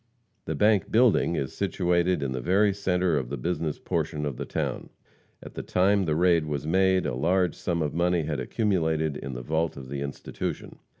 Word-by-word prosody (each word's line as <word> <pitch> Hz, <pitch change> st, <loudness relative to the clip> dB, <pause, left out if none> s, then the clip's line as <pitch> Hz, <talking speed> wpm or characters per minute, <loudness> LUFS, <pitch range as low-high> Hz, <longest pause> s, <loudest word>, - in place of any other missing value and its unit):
The -, -, -2 dB
bank 105 Hz, -3 st, +2 dB
building 115 Hz, -6 st, +4 dB
is 65 Hz, -4 st, -3 dB
situated 90 Hz, -3 st, +1 dB
in 65 Hz, -, -2 dB
the 65 Hz, -1 st, -3 dB
very 100 Hz, -, +3 dB
center 90 Hz, -4 st, +1 dB
of 60 Hz, -3 st, -6 dB
the 70 Hz, -, -3 dB
business 80 Hz, +2 st, -2 dB
portion 80 Hz, -2 st, -2 dB
of 70 Hz, -3 st, -3 dB
the -, -, -4 dB
town. -, -, -3 dB, 0.5 s
At -, -, -10 dB
the -, -, -5 dB
time 95 Hz, +1 st, +2 dB
the 75 Hz, -2 st, 0 dB
raid 85 Hz, -1 st, +3 dB
was 75 Hz, -1 st, -3 dB
made 95 Hz, +2 st, +2 dB
a -, -, -1 dB
large 90 Hz, +6 st, +1 dB
sum 85 Hz, -3 st, -2 dB
of 75 Hz, -, -2 dB
money 85 Hz, 0 st, +1 dB
had 75 Hz, -2 st, -3 dB
accumulated 80 Hz, -, 0 dB
in 70 Hz, -, -6 dB
the -, -, -6 dB
vault 80 Hz, +3 st, -1 dB
of 65 Hz, -2 st, -9 dB
the 70 Hz, 0 st, -4 dB
institution. 70 Hz, 0 st, -5 dB
85 Hz, 195 wpm, -26 LUFS, 75-95 Hz, 0.5 s, building